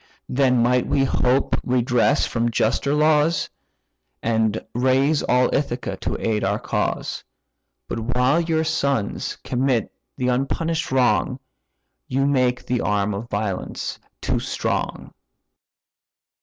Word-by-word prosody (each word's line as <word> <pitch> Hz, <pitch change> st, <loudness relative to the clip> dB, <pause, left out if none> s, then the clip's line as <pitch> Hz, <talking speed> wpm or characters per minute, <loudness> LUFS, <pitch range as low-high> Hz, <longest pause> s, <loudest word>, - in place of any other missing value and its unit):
Then 125 Hz, -2 st, +3 dB
might 125 Hz, +1 st, +2 dB
we 140 Hz, -2 st, +2 dB
hope 130 Hz, 0 st, +2 dB
redress 125 Hz, +2 st, +2 dB
from 115 Hz, 0 st, 0 dB
juster 120 Hz, +5 st, +1 dB
laws, 150 Hz, +1 st, +2 dB, 0.7 s
And 110 Hz, -1 st, 0 dB
raise 130 Hz, +4 st, +2 dB
all 125 Hz, 0 st, +2 dB
Ithaca 130 Hz, -4 st, -1 dB
to -, -, -3 dB
aid 110 Hz, -2 st, 0 dB
our -, -, +1 dB
cause: -, -, -2 dB, 0.6 s
But -, -, -3 dB, 0.2 s
while 130 Hz, +6 st, +3 dB
your 160 Hz, -1 st, 0 dB
sons 140 Hz, -8 st, -1 dB
commit 125 Hz, -2 st, 0 dB, 0.3 s
the 125 Hz, -, -1 dB
unpunish'd 160 Hz, +6 st, -1 dB
wrong, 130 Hz, 0 st, +2 dB, 0.7 s
You 135 Hz, +2 st, +1 dB
make 130 Hz, -3 st, +1 dB
the 125 Hz, -1 st, 0 dB
arm 105 Hz, 0 st, 0 dB
of 110 Hz, +4 st, -6 dB
violence 100 Hz, -3 st, -3 dB, 0.2 s
too -, -, 0 dB
strong." -, -, -3 dB
125 Hz, 115 wpm, -22 LUFS, 120-140 Hz, 0.7 s, Then